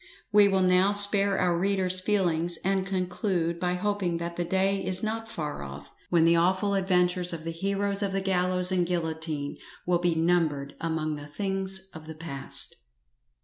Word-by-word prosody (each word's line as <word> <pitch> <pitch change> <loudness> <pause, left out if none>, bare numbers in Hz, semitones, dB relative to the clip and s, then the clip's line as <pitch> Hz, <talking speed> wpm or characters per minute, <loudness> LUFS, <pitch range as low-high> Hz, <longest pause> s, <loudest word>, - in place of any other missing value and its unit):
We 205 -1 +6
will 190 -1 +1
now 185 +2 +3
spare 200 -1 +7
our 180 -2 +1
reader's 185 0 +1
feelings, 175 -4 0
and 190 0 0
conclude 180 -2 -2
by 180 0 -1
hoping 190 -3 -2
that 170 0 -5
the 175 - -2
day 190 +2 0
is 185 +2 +5
not 225 +1 -3
far 150 - -5
off, 70 0 -10 0.2
when 170 -2 +3
the 170 0 +4
awful 185 +4 +1
adventures 180 -2 +1
of 160 -1 -6
the 165 - -4
heroes 200 +3 -2
of 200 -1 -1
the 195 - -1
gallows 180 -1 +1
and 180 -2 0
guillotine 160 -4 -3 0.3
will 175 -1 +1
be 175 -1 0
numbered 160 -4 0
among 155 -2 -3
the 145 0 -10
things 190 +2 -3
of 160 -1 -11
the 160 - -8
past. 150 -4 -3
180 Hz, 175 wpm, -26 LUFS, 165-195 Hz, 0.3 s, spare